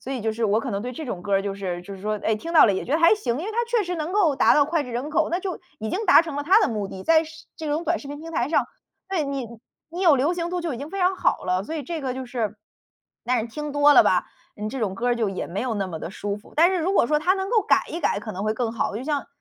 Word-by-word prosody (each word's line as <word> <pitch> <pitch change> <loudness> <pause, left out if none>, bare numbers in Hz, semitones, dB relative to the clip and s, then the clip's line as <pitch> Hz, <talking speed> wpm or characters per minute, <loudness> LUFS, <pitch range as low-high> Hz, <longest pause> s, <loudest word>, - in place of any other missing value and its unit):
所 270 - -6
以 255 - -3
就 220 0 -1
是 230 +1 -2
我 210 0 +3
可 260 - -4
能 200 +1 -2
对 250 - -4
这 305 +3 -7
种 180 -7 -5
歌 200 +1 0
儿 195 - +2
就 200 -1 -3
是 185 -3 -4
就 200 +2 -9
是 190 - -12
说， 215 0 -1
诶， 220 - +2
听 335 +10 -6
到 315 - +8
了 205 - +3
也 - - -3
觉 - - -9
得 315 - +3
还 335 +5 +6
行， 255 - -2
因 330 - -4
为 440 - -4
它 475 +1 0
确 470 -4 +1
实 360 - -3
能 315 +2 -3
够 370 -8 +3
达 - - +5
到 290 - +5
脍 330 -2 0
炙 250 - -8
人 260 +6 -3
口， - - +1
那 345 - 0
就 375 -2 -4 0.2
已 220 0 -4
经 435 - -2
达 - - +8
成 320 -4 -6
了 290 - -1
它 380 +8 +5
的 - - +3
目 210 -4 -3
的， 190 0 -8
在 320 -1 +5
是 315 0 -13
这 315 - -6
种 305 +4 -1
短 340 +1 +1
视 280 - -10
频 290 0 -6
平 330 +1 -9
台 305 - 0
上， 325 - +2 0.4
对， 380 -4 0
你 275 -3 -3 0.4
你 345 +2 -6
有 320 -6 +6
流 295 +7 +1
行 340 -1 -3
度 360 0 -2
就 330 -6 -3
已 - - -7
经 290 +2 -7
非 390 - -5
常 365 +1 +3
好 - - 0
了。 185 0 0
所 315 - -5
以 300 - -4
这 330 +2 -4
个 265 -3 -2
就 260 0 -6
是 225 -4 -3 0.7
但 250 0 +1
是 220 - -4
听 295 +5 -6
多 290 0 +5
了 - - +8
吧， - - +3 0.3
嗯， 210 +1 -4
这 270 - -5
种 200 -4 -1
歌 240 +5 -1
儿 240 - +2
就 225 -3 0
也 195 - -4
没 190 +4 -4
有 245 -2 -2
那 200 -2 -1
么 165 -3 -6
地 - - -5
舒 200 +1 -4
服， 205 - -17
但 340 +4 +6
是 375 - 0
如 360 +4 0
果 235 - +4
说 300 0 +2
它 360 +5 +2
能 385 +1 -3
够 460 - +4
改 - - +3
一 335 - -5
改 - - +1
可 215 0 -6
能 190 - -5
会 215 0 0
更 230 -1 -2
好。 215 -2 -2
就 245 - -5
像 290 -1 -2
280 Hz, 365 characters per minute, -24 LUFS, 215-330 Hz, 0.7 s, 到